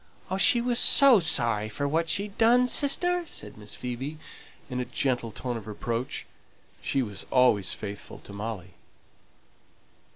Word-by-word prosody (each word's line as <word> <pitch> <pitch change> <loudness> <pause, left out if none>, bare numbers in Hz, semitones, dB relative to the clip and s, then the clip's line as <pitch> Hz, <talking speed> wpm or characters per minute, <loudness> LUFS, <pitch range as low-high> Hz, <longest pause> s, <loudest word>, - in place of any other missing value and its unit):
"She 235 +4 +5
was 240 0 +2
so 275 -6 +7
sorry 115 - 0
for 140 +7 -3
what 165 +3 -1
she'd 200 +3 -2
done, 240 +2 +4
sister," 350 +7 +2
said - - -9
Miss 105 -1 -10
Phoebe, 130 +5 -6 0.5
in 125 -2 -5
a 125 - -3
gentle 120 -4 -2
tone 120 +2 -5
of 110 - -11
reproach; 115 +3 -5 0.6
she 135 - -1
was 105 -4 -9
always 125 -7 +2
faithful 100 -1 -9
to 100 - -13
Molly. 100 -3 -7
125 Hz, 140 wpm, -26 LUFS, -, 0.6 s, so